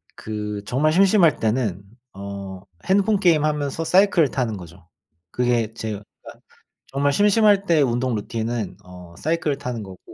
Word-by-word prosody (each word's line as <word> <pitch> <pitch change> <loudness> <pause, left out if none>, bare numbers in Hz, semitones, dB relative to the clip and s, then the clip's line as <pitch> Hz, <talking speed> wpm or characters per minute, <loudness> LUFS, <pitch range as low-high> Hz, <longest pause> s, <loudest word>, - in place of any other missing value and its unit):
그 105 -1 -5
정말 150 +7 +1
심심할 185 - +4
때는 110 -4 -1 0.3
어 100 -1 -7 0.2
핸드폰 200 +2 +2
게임 170 -6 +3
하면서 150 +1 -2
사이클을 180 -4 +4
타는 115 -5 -2
거죠. 85 -1 -13 0.4
그게 120 -3 0
제가 110 -2 -5 0.8
정말 140 +1 0
심심할 205 +1 +4
때 165 -4 +3
운동 125 -1 0
루틴은 110 -1 -4
어 90 -2 -13
사이클을 155 -3 -1
타는 125 -5 -5
거고 95 -2 -11
125 Hz, 290 characters per minute, -22 LUFS, 105-160 Hz, 0.8 s, 심심할